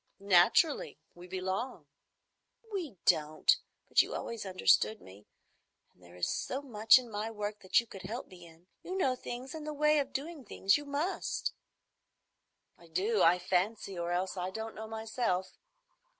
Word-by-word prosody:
"Naturally. 200 - +4 0.2
We 175 +1 -12
belong." 190 - -3 0.9
"We 325 - -4
don't; 155 0 +4 0.3
but - - +6
you - - -4
always 230 -4 -5
understood 190 +3 +3
me, 100 +3 -15 0.7
and - - -30
there 85 0 -16
is 90 - -1
so 265 - -2
much 225 -3 +6
in 255 -1 -3
my 210 +1 -3
work 210 -1 -4
that 185 -1 +3
you 235 - -3
could 195 -4 -10
help 220 +7 -5
me 175 -2 -14
in. 165 +1 -19 0.2
You 370 +1 -5
know 265 -9 +2
things 250 +1 -7
and 310 -1 -7
the 305 - -4
ways 300 0 +4
of 275 0 -6
doing 295 +2 -5
things. 195 -2 +2
You 290 - -2
must." 290 +6 -2 1.3
"I 170 - -16
do, 195 +7 0
I 170 +2 +6
fancy, 190 +3 -1
or 170 0 -3
else 185 +2 -1
I 180 0 -2
don't 220 +3 -6
know 220 0 -7
myself. 220 -4 -2
210 Hz, 165 wpm, -32 LUFS, 180-255 Hz, 1.3 s, but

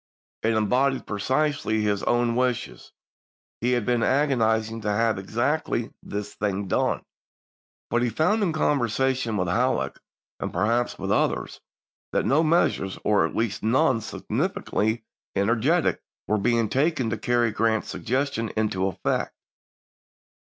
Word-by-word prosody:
It 115 +1 +2
embodied 130 +5 +1
precisely 130 +1 0
his 105 -1 0
own 120 -1 +1
wishes; 125 -1 -2 0.7
he 125 +2 +1
had 120 -4 0
been 120 -1 +1
agonizing 115 -5 +1
to 105 - -2
have 110 0 +1
exactly 120 +4 -1
this 105 0 -5
thing 100 -1 -2
done. - - 0 0.9
But 120 +1 +2
he 120 - +1
found, 170 - +1
in 190 -5 +2
conversation 130 -5 +1
with 90 -2 0
Halleck, 125 +8 0 0.4
and - - -3
perhaps 115 +6 0
with - - -3
others, - - 0 0.5
that - - +1
no 145 +4 +4
measures, 155 - +1
or 105 -1 +3
at - - -10
least 110 -2 -1
none 130 +1 +2
sufficiently 110 +2 -2 0.3
ener 110 +4 +1
getic, 165 +6 +2 0.3
were 105 +1 +1
being 115 +2 +2
taken 135 -2 +1
to 115 - -1
carry 120 0 +2
Grant's 110 0 0
suggestion 130 -3 -1
into 95 -3 +1
effect. 95 - -2
115 Hz, 135 wpm, -25 LUFS, 110-130 Hz, 0.9 s, no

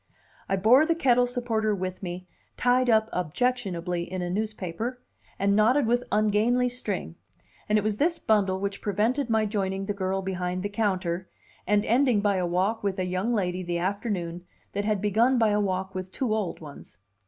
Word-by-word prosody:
I 195 - +2
bore 225 +9 +5
the 335 - +2
kettle 245 -5 +3
supporter 225 -4 0
with 185 -1 -4
me, 180 -1 -6 0.3
tied 250 0 +3
up 220 -1 +4
objectionably 180 -3 -1
in 180 -1 -3
newspaper, 215 +3 -3 0.4
and 200 0 +2
knotted 240 +6 +4
with 240 +2 +1
ungainly 215 +4 +2
string; 205 - -4 0.5
and 210 - +4
it 210 - +1
was 215 -1 -1
this 335 +5 +1
bundle 200 -7 +1
which 200 0 -3
prevented 225 +7 0
my 220 -1 +2
joining 195 -2 -2
the 205 - -2
girl 190 -1 -2
behind 185 -1 -3
the 205 - -2
counter, 185 -4 -1 0.4
and 205 0 +2
ending 245 -1 +3
by 200 -1 +1
a 180 -1 0
walk 190 +6 0
with 200 -1 -1
a 185 - -1
young 185 +5 -1
lady 185 -5 -1
the 175 -1 -2
afternoon 180 -2 -2 0.3
that 205 +1 -2
had 210 -2 0
begun 225 +5 +3
by 225 -2 +4
a 210 0 +2
walk 190 -1 -2
with 185 0 -5
two 240 -1 -1
old 210 -7 -2
ones. 145 - -11
205 Hz, 180 wpm, -26 LUFS, 185-225 Hz, 0.5 s, bore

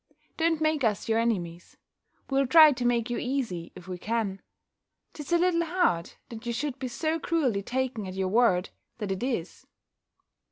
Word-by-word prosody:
Don't 325 -1 +1
make 310 -2 +1
us 215 -3 0
your 225 0 +2
enemies: 175 -7 -2 0.5
we'll 270 -1 +1
try 310 +1 +8
to 250 -3 -3
make 240 0 +1
you 240 - -1
easy, 240 -11 -3
if 180 - -12
we 180 -1 -6
can. 210 -2 -2 0.7
'Tis 295 +1 -8
a 345 - +5
little 340 -1 +2
hard, 330 - 0 0.2
that 225 -1 -9
you 235 - -1
should 270 +1 -3
be 260 - -3
so 315 +6 -2
cruelly 270 -12 0
taken 245 -2 -2
at 185 - -7
your 190 0 -1
word, 195 -4 +2 0.3
that 210 -4 -4
it 190 - -3
is." 235 -9 -3
240 Hz, 175 wpm, -27 LUFS, 195-295 Hz, 0.7 s, try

